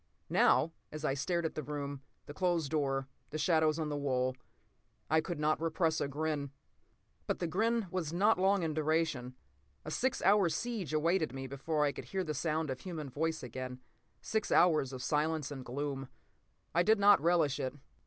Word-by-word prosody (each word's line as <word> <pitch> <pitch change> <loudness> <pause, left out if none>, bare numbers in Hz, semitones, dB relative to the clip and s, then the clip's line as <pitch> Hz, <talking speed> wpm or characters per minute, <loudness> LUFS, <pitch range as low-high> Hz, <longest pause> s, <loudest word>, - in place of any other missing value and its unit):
Now, 165 - +4 0.2
as 155 0 -5
I 135 - +2
stared 170 +5 -1
at 160 - -2
the 155 - -3
room, 140 -1 -5 0.2
the 145 - -8
closed 170 -3 0
door, 135 -3 0 0.2
the 155 - -4
shadows 155 -1 +3
on 155 -2 -2
the 145 - -2
wall, 130 -3 0 0.8
I 160 0 +5
could 170 -1 -5
not 155 +1 +1
repress 165 0 +1
a - - 0
grin. 145 0 -2 0.8
But - - 0
the - - -2
grin 225 +6 +1
was 175 -5 -2
not 200 +4 +3
long 195 0 +3
in 160 -1 -1
duration. 155 -5 0 0.5
A 155 - -5
six 260 +9 0
hour 195 -2 +5
siege 220 - -3
awaited 155 -1 +1
me 135 0 -5
before 150 +3 -1
I 145 - +2
could - - -8
hear 190 -1 -2
the 155 -3 -3
sound 155 -2 -1
of 130 - -4
human 155 -7 -6
voice 160 +2 -1
again—six 125 - -5
hours 155 -7 +4
of 130 -1 -6
silence 150 -1 0
and 135 -2 -6
gloom. 135 +1 -4 0.6
I 170 - +4
did 220 +5 +4
not 200 -4 +6
relish 165 -4 +2
it. 130 +1 -2
155 Hz, 185 wpm, -33 LUFS, 140-170 Hz, 0.8 s, not